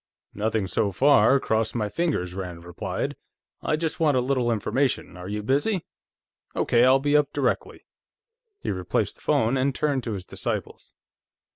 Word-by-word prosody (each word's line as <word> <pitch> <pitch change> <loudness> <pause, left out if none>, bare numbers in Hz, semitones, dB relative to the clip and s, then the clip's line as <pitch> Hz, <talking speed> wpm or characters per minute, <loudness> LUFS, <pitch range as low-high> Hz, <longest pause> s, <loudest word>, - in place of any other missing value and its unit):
"Nothing, 110 0 0
so 100 +2 0
far 140 +5 +5
cross 110 -2 0
my 110 -3 0
fingers," 105 - -1
Rand 90 -3 -6
replied. 85 -1 -3 0.5
"I - - +1
just 160 0 -2
want 150 -5 +3
a - - +4
little 125 -1 +1
information. 130 +4 0
Are 90 +1 -8
you 105 +1 -3
busy?... 145 - +1 0.7
Okay, 120 0 +3
I'll 130 +1 +6
be 145 +2 +1
up 150 -1 +3
directly." - - -1 0.8
He - - -2
replaced 90 -2 -1
the - - -20
phone 115 +4 +2
and 130 0 +1
turned 140 -4 0
to 115 - -2
his 95 -3 -6
disciples. - - -5
120 Hz, 160 wpm, -25 LUFS, 105-140 Hz, 0.8 s, I'll